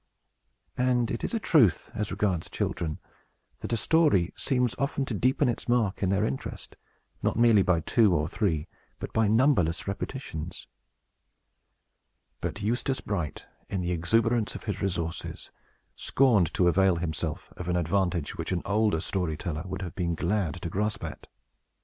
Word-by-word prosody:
And 125 -2 +2
it 115 - -3
is - - -1
a - - +1
truth, 130 - +3
as 105 -2 -2
regards 95 -4 -1
children, 80 -3 -2 0.6
that - - -6
a 115 - +2
story 145 - +3
seems 125 -3 +1
often 140 0 0
to 125 - -4
deepen 130 +6 +2
its 120 0 -2
mark 115 -5 +1
in 95 - +1
their 100 +2 +2
interest, 130 - -5 0.5
not - - 0
merely 115 -3 +6
by 90 -3 +2
two 105 0 +3
or 75 0 +1
three, 85 -5 -1 0.3
but - - -7
by 110 -1 +3
numberless 110 - +2
repetitions. 100 - -5 1.7
But 105 - -4
Eustace 120 +4 0
Bright, 90 -9 -3 0.2
in 95 - -2
the 90 0 -1
exuberance 115 +6 +1
of - - -7
his 100 -3 -3
resources, 85 -4 -3 0.4
scorned 115 - +3
to 90 - +3
avail 95 +1 +4
himself 85 +1 -4
of 90 0 -6
an 90 - +1
advantage 90 -2 0
which - - -4
an 90 -2 -1
older 100 -4 +2
story 90 -5 -1
teller 80 0 -4
would 95 +1 -4
have 85 - -6
been 85 -2 -1
glad 90 -2 -1
to 85 - -2
grasp 105 +2 -1
at. - - -7
100 Hz, 160 wpm, -28 LUFS, 85-115 Hz, 1.7 s, merely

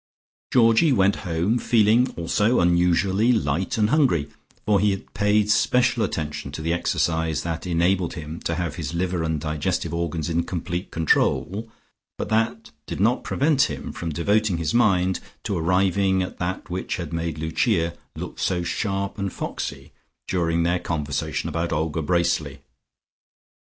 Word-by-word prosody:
Georgie 115 +5 +5
went 100 -5 +3
home, 85 +9 +1
feeling 115 +2 +3
also 105 +8 +2
unusually 90 +5 +3
light 95 - 0
and 105 +1 +2
hungry, 130 - +3 0.4
for 105 -2 +3
he 105 +2 +3
had 95 -1 -4
paid 105 +1 +2
special 125 +2 +3
attention 75 -7 -3
to 70 - -6
the 85 +1 0
exercise 80 -2 0
that 85 +1 -4
enabled 90 +1 +1
him 80 0 -7
to 80 - -2
have 85 -3 -3
his 80 -1 -4
liver 90 0 -1
and 80 -1 -1
digestive 75 +1 -2
organs 85 -2 -2
in 85 0 +1
complete 85 +1 -4
control, 95 +6 +1 0.5
but - - -4
that 110 -9 0 0.2
did - - -5
not 115 +6 +2
prevent 140 -1 +2
him - - -5
from 85 - -5
devoting 100 +4 +1
his 80 -2 -2
mind 95 -6 +3 0.2
to 100 - -2
arriving 95 +2 +2
at 90 - -7
that 90 +2 -3
which 90 0 -3
had 85 -3 -6
made 85 -2 -2
Lucia 85 +2 0 0.2
look - - -7
so 90 -2 0
sharp 100 +2 -2
and 100 -1 -2
foxy - - -5 0.4
during 85 -2 +1
their 90 +1 +1
conversation 75 -5 -2
about 85 0 -2
Olga 80 +1 -1
Bracely. 80 -4 0
90 Hz, 150 wpm, -24 LUFS, 80-105 Hz, 0.5 s, Georgie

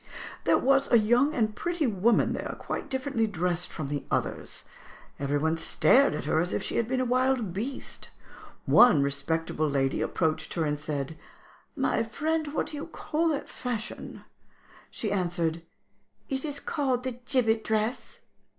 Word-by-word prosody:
"There - - +5
was 275 +1 +3
a 235 - +8
young 240 +8 +3
and 215 -3 +1
pretty 345 -3 -1
woman 220 0 +2
there, - - -4
quite - - -5
differently 260 -4 0
dressed 180 -3 -1
from 155 -4 -5
the 145 0 -2
others; - - -2 0.6
every 140 +1 0
one 160 +2 +1
stared 260 - +4
at 150 - -4
her 155 - +2
as 175 +2 -1
if - - -1
she - - -2
had 235 - +1
been 255 +1 0
a - - 0
wild 250 -5 +1
beast. 245 +8 -4 0.6
One 240 - +7
respectable 155 +2 0
lady 135 -1 0
approached 160 -2 -1
her 165 -2 +1
and 150 -1 -1
said, 150 0 -4 0.6
'My 265 -5 +1
friend, 305 +6 -1
what - - +1
do 300 - -7
you 290 - -5
call 330 0 -1
that 305 -3 -1
fashion?' 235 -3 -5 0.7
She 215 - -3
answered, 170 -4 0 0.7
'It 265 -1 -2
is 285 -2 -4
called 260 -5 -1
the 255 -2 -4
"gibbet 225 -4 +2
dress."' 220 +3 -2
220 Hz, 160 wpm, -28 LUFS, 160-265 Hz, 0.7 s, a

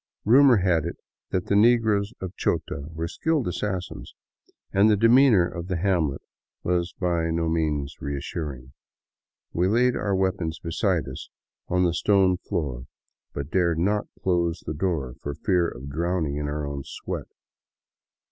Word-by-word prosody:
Rumor 130 +2 +7
had 90 -5 +2
it - - -4 0.3
that 90 -2 -1
the 100 - +1
negroes 110 -2 +4
of 95 -1 -6
Chota 70 - -2
were 80 +1 -3
skilled 155 - 0
assassins, 95 0 -4 0.6
and 100 +3 +5
the 105 - +4
demeanor 115 -4 +5
of 85 0 -6
the 95 -2 -1
hamlet 85 -6 0 0.4
was 90 -1 0
by 85 -2 0
no 80 0 0
means 75 -4 -1
reassuring. 70 -2 -5 0.8
We 90 +2 +2
laid 120 +4 +3
our 100 -2 0
weapons 90 -4 -1
beside 85 - -1
us 65 - -8 0.4
on 90 0 +2
the 85 -2 +2
stone 95 -1 +3
floor, 70 - -4 0.5
but 70 +2 -5
dared 85 -3 +2
not 100 +5 +1 0.2
close 85 -2 +1
the 75 - -5
door 75 -6 -2
for 70 0 -4
feai 90 -4 0
of 70 +3 -8
drowning 85 -1 -1
in 75 0 -2
our 75 0 -3
own 70 -1 -4
sweat. - - -6
85 Hz, 150 wpm, -25 LUFS, 80-100 Hz, 0.8 s, Rumor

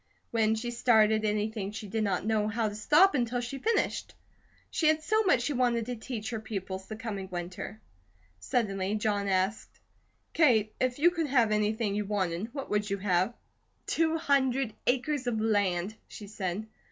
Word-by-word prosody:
When 220 -1 +2
she 240 +2 -3
started 220 -3 +3
anything 210 -1 -1
she 210 0 -7
did 220 +2 -1
not 195 -2 -1
know 215 -1 +1
how 220 +1 0
to - - -8
stop 300 - +5
until 245 -2 0
she 245 +3 -5
finished. 455 - -1 0.6
She 315 - +1
had 310 0 +3
so 435 +6 +2
much 360 - +3
she 285 - -1
wanted 240 -3 +1
to 245 +1 -4
teach 225 0 -5
her 225 - -3
pupils 190 -3 -5
the 215 - -6
coming 210 -5 -5
winter. 180 +4 -6 0.6
Suddenly 195 - -1
John 205 -1 0
asked: 190 +2 -1 0.5
"Kate, 225 -9 +3
if 255 -1 0
you 340 +4 +5
could 330 -3 -1
have 245 -5 +3
anything 210 0 +1
you 210 0 -1
wanted, 195 +1 -2
what 275 0 -6
would 210 0 0
you 200 - -1
have?" 190 +3 +1 0.5
"Two 325 0 +1
hundred 270 -6 +1
acres 260 +1 0
of 225 -3 0
land," 205 -3 +1
she 210 - -10
said. 195 0 -4
220 Hz, 175 wpm, -29 LUFS, 205-250 Hz, 0.6 s, stop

